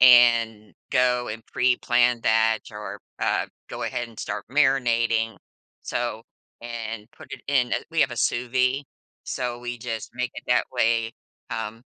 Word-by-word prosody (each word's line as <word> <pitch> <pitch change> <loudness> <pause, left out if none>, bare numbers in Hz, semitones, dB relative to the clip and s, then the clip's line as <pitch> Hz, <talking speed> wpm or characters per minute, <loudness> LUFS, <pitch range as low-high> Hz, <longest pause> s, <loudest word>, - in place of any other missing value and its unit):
and 115 -4 +6 0.2
go 125 -1 +3
and 110 +1 -5
preplan 125 -1 +3
that, 110 0 +3
or, 105 -1 -7 0.2
uh, - - +1 0.2
go - - -5
ahead 120 -1 -2
and 115 - -16
start 105 +1 -4
marinating. 115 -6 +3 0.5
So 120 -2 -2 0.4
and 115 -2 -5
put 135 - -13
it 135 - -6
in 130 -4 +2
a - - +4
we 165 -1 +1
have 140 - +4
a 120 - -6
sous 120 +2 +1
vide, 130 +2 +2 0.4
so 125 -2 -3
we 120 0 -5
just 115 -2 -4
make 125 0 -1
it - - -7
that 125 - +4
way, 115 -2 +2 0.4
um, 115 0 -4
120 Hz, 155 wpm, -25 LUFS, 115-125 Hz, 0.5 s, and